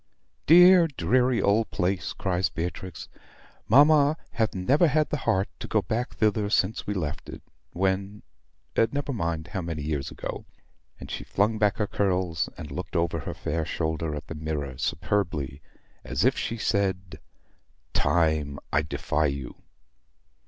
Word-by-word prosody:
"Dear, 180 +1 +8
dreary 125 - +1
old 105 +2 +2
place!" 90 0 -1
cries 95 -1 0
Beatrix. 90 +2 -5 0.6
"Mamma 145 +4 +6
hath 110 -3 -1
never 135 - +3
had 155 +1 +1
the 150 - 0
heart 95 +1 +2
to - - -6
go - - +1
back 120 +3 -3
thither 105 -1 +1
since 100 +1 +1
we 105 - -1
left 75 -6 -4
it, - - -9 0.3
when 95 +2 -1 0.5
never 140 +4 +1
mind 85 -6 -3
how 95 - -3
many 80 -3 -4
years 75 -2 -2
ago." - - -7 0.5
And - - -9
she - - -4
flung 105 +2 0
back 105 0 +2
her 105 - +1
curls, 90 -5 0
and 75 -4 -8
looked 90 +6 -6
over 85 -1 +1
her 70 - -6
fair 80 -1 -2
shoulder 80 -1 -2
at 75 - -6
the - - -7
mirror 75 -3 -4
superbly, 80 -6 -1 0.4
as 65 +2 -1
if - - +4
she 115 - -3
said, 95 -4 -1 0.7
"Time, 80 -4 +1 0.2
I 75 - +4
defy 75 0 -1
you." 70 -3 -6
95 Hz, 150 wpm, -26 LUFS, 80-110 Hz, 0.7 s, Dear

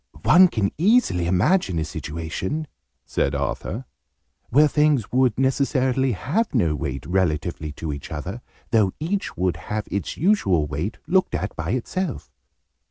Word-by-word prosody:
"One 185 +1 +7
can 105 - -1
easily 180 - +3
imagine 95 - +2
a 80 - 0
situation," 85 - -4 0.4
said 70 +1 0
Arthur, 70 - -3 0.6
"where 150 +4 +5
things 150 -6 +2
would 125 -3 +2
necessarily 130 -1 +1
have 140 - -1
no 85 -10 +2
weight, 70 -2 -4
relatively 85 -3 -1
to 75 0 -4
each 70 - -8
other, 95 +10 -5 0.3
though 105 -5 +3
each 185 - -2
would 90 0 0
have 105 0 -4
its 100 - -3
usual 125 - +2
weight, 75 +9 -4
looked 185 +1 +2
at 100 - -3
by - - -2
itself." 145 +5 -3
105 Hz, 140 wpm, -23 LUFS, -, 0.6 s, One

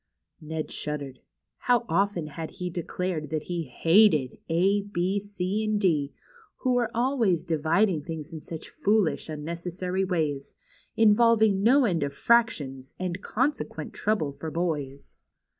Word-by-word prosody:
Ned 155 0 -5
shuddered. 145 -3 -4 0.5
How 245 -1 +4
often 185 -1 +1
had 160 +2 -7
he 180 -2 -3
declared 170 -2 -3
that 155 0 -2
he 175 -2 -3
hated 165 - +3
" - - -43
A, 190 +5 +3
B, 195 0 -1
C, 200 +1 -3
and 215 -1 0
D, 155 -8 +1 0.5
who 255 -2 +2
were 240 -2 +1
always 230 - +1
dividing 165 +2 +2
things 160 +1 -7
in 160 - -5
such 160 +1 -8
foolish, 205 -6 +1
unnecessary 170 +4 -3
ways, 155 -7 -2 0.4
involving 220 -2 +5
no 255 +5 +5
end 175 -7 +1
of 140 -1 -2
fractions, 140 - +1
and 185 0 -3
consequent 270 +8 -2
trouble 210 -9 0
for 140 +3 -6
boys 150 -5 -3
175 Hz, 140 wpm, -27 LUFS, 155-205 Hz, 0.5 s, involving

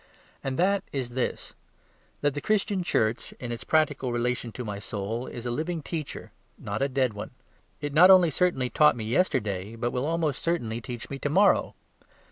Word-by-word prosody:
And 135 -1 -2
that 195 +2 +2
is 130 -3 -3
this: 125 +1 -3 0.7
that 145 -1 +2
the 145 - -4
Christian 210 -2 +1
Church 115 -9 0
in 120 -1 -7
its 120 - -5
practical 145 -5 +1
relation 120 0 -1
to 125 - -6
my 100 -2 -4
soul 110 +4 -4
is 120 0 -7
a 120 - -1
living 160 +5 -2
teacher, 155 -2 -5 0.3
not 105 +5 -4
a 140 - +2
dead 130 -3 +1
one. 105 - -6 0.5
It 145 -1 -3
not 175 +5 +8
only 185 -4 +7
certainly 140 -7 +1
taught 150 -4 +5
me 115 - -5
yesterday, 110 - 0
but 120 +1 -2
will 125 +3 -1
almost 160 -4 -1
certainly 120 -10 -1
teach 120 +2 -7
me 135 - -4
to 145 - -1
morrow. 195 +6 +3
135 Hz, 185 wpm, -27 LUFS, 120-160 Hz, 0.7 s, not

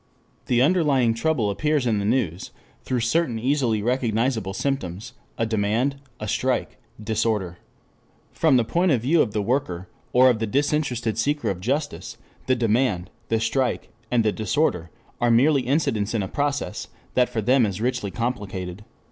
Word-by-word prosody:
The 125 0 +3
underlying 140 -8 +3
trouble 115 -4 0
appears 145 +6 0
in 110 -4 +1
the 100 - -2
news 105 -7 -1 0.3
through 125 -2 -2
certain 120 +1 +1
easily 120 -3 +1
recognizable 115 -4 0
symptoms, 115 -4 -3 0.2
a 115 - +1
demand, 110 +5 0 0.2
a 105 - -5
strike, - - -1 0.2
disorder. 105 -4 -1 0.7
From 155 -5 +3
the 120 - +3
point 175 +8 +1
of 125 -5 +2
view 155 +5 +4
of 110 - 0
the 105 0 -1
worker, 95 -7 -2 0.2
or 130 +1 +6
of 115 - -2
the 110 - -1
disinterested 130 -4 0
seeker 145 +2 0
of 90 - -5
justice, 140 +8 -3 0.3
the 130 - +3
demand, 110 -6 0 0.2
the 115 - +2
strike, 115 +3 -1 0.2
and 120 -2 +2
the 110 - +3
disorder, 110 - 0 0.3
are 120 - +3
merely 135 +5 +4
incidents 120 -6 0
in 105 - 0
a - - -3
process 145 +5 -2 0.3
that 125 -1 +3
for 115 -3 -2
them 125 +3 +4
is 100 -2 -1
richly 120 -3 -1
complicated. 100 -5 -4
120 Hz, 160 wpm, -24 LUFS, 105-135 Hz, 0.7 s, or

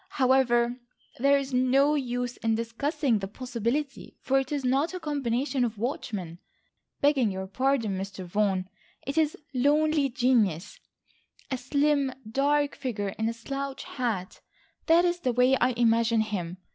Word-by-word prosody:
However, 250 -2 +3 0.4
there 280 +2 +4
is 275 -1 -4
no 265 +3 +3
use 245 -3 -2
in 225 -1 0
discussing 235 +2 -1
the 195 - -4
possibility, 255 +5 -4
for 270 0 +2
it 270 +1 -4
is 285 -3 -2
not 275 +8 +1
a - - -4
combination 275 -3 -1
of 230 -2 -2
watchmen, 200 - -4 0.6
begging 280 -6 +3
your 190 0 -4
pardon, 230 -2 0
Mr. 190 -1 -6
Vaughan. 190 0 0 0.4
It 275 - -3
is 315 -2 +1 0.2
lonely 290 +2 +2
genius, 230 - +1 0.7
a 260 - 0
slim, 280 +1 +1 0.2
dark 285 +4 +1
figure 225 -7 -3
in 220 +3 -2
a - - -3
slouch 275 +4 -5
hat. 220 -8 -4 0.5
That 335 +2 +5
is 350 0 0
the 255 -7 0
way 250 +2 +4
I 255 0 +2
imagine 230 -1 +3
him. 185 -5 -3
250 Hz, 145 wpm, -27 LUFS, 225-280 Hz, 0.7 s, That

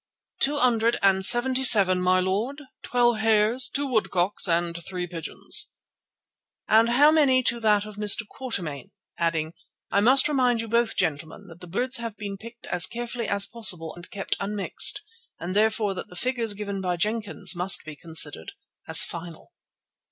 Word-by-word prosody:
"Two 290 +2 +3
hundred 235 -3 +1
and 190 -1 +3
seventy 255 +4 +3
seven, 190 -7 +5
my 185 0 +2
lord, 205 +10 -2 0.2
twelve 240 -2 +1
hares, 220 +3 +3
two 285 +1 -2
woodcocks, 205 -7 0
and 170 0 -2
three 180 +1 -5
pigeons." 165 -2 -1 0.9
"And 225 +2 +4
how 285 +6 +5
many 275 -5 +3
to 235 - -2
that 210 -2 +1
of 215 -1 -12
Mr. 210 +1 +2
Quatermain?" 195 - -6 0.3
adding: 165 -1 -2 0.4
"I 200 - +2
must 260 +5 +4
remind 255 -5 +1
you 230 - -4
both, 235 0 0
gentlemen, 160 +6 -3
that 165 +1 -15
the 180 - -10
birds 245 +9 -2
have 230 -3 -7
been 200 -2 -6
picked 230 +3 -12
as 175 -1 +2
carefully 240 0 -5
as 200 0 +1
possible 180 -9 0
and 175 +1 -14
kept 195 - -4
unmixed, 205 - +1 0.4
and 175 +3 -6
therefore 215 -1 +1
that 185 - -8
the 180 - -15
figures 230 +1 -2
given 200 -1 -5
by 180 -2 -2
Jenkins 210 -2 -2
must 180 0 +1
be 155 -1 -9
considered 155 - -1 0.3
as - - +6
final." 170 - -9
210 Hz, 165 wpm, -24 LUFS, 180-235 Hz, 0.9 s, as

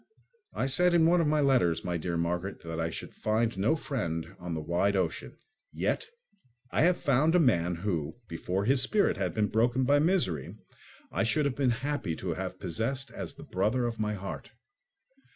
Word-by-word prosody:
I - - 0
said 175 +6 +3
in 165 -2 +5
one 170 +1 +4
of 160 - +1
my 150 0 +2
letters, 125 - +3
my 90 -1 -2
dear 85 +1 -2
Margaret, 85 +3 -2
that 80 -1 -5
I 80 0 0
should - - -7
find 110 +1 0
no 100 +11 +2
friend 90 - -3
on 90 -2 -4
the - - -2
wide 85 +6 +1
ocean; 90 -4 -2 0.3
yet 450 - -1 0.6
I - - +1
have 175 +3 +4
found 150 +3 +2
a - - +6
man 90 - +2
who, 85 -3 -2
before 90 +4 -2
his 130 +2 +3
spirit 200 +10 +2
had - - -2
been 105 -1 +2
broken 120 +4 +2
by 145 +3 +4
misery, 150 - 0 0.6
I - - -1
should 145 +7 +2
have 140 -3 0
been 135 -3 +2 0.2
happy 145 - -1
to 85 0 -3
have 95 +1 -5
possessed 115 +10 -2
as - - -6
the - - -11
brother 110 +7 0
of 115 -1 -3
my 105 0 -1
heart. 95 0 -7
110 Hz, 190 wpm, -29 LUFS, 85-140 Hz, 0.6 s, a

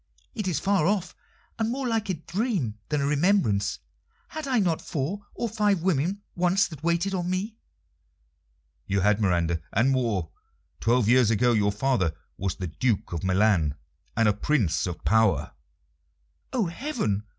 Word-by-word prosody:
"It 210 -7 -3
is 165 -6 0
far 195 -2 +2
off, 190 -4 -1 0.4
and 225 0 +1
more 260 +2 -2
like 225 -3 -1
a 185 - +1
dream 165 - -2
than 150 -1 0
a - - +1
remembrance. 145 - +2 0.5
Had 315 -2 -5
I 260 -2 +2
not 175 -7 +1
four 185 +9 -4
or 235 - -1
five 205 -5 +1
women 185 +3 0
once 180 +3 +2
that 155 -4 -10
waited 170 +3 +1
on 180 -2 -1
me?" 205 +5 -3 1.3
"You 100 0 +1
had, 105 +2 +3
Miranda, 85 -4 +1
and 120 +6 +3
more. 115 -11 0 0.5
Twelve 120 -1 +2
years 120 -1 +5
ago 120 +2 +3
your 105 -2 +2
father 105 - 0 0.2
was 95 0 -2
the 95 - -5
Duke 100 +4 -1
of 85 - -3
Milan, 95 -6 +2 0.4
and 115 -1 +4
a 105 - +4
Prince 105 - +1
of 90 - -6
power." 110 -2 +3 1.0
"Oh, 240 -5 +1
heaven! 170 - -2
140 Hz, 160 wpm, -26 LUFS, -, 1.3 s, years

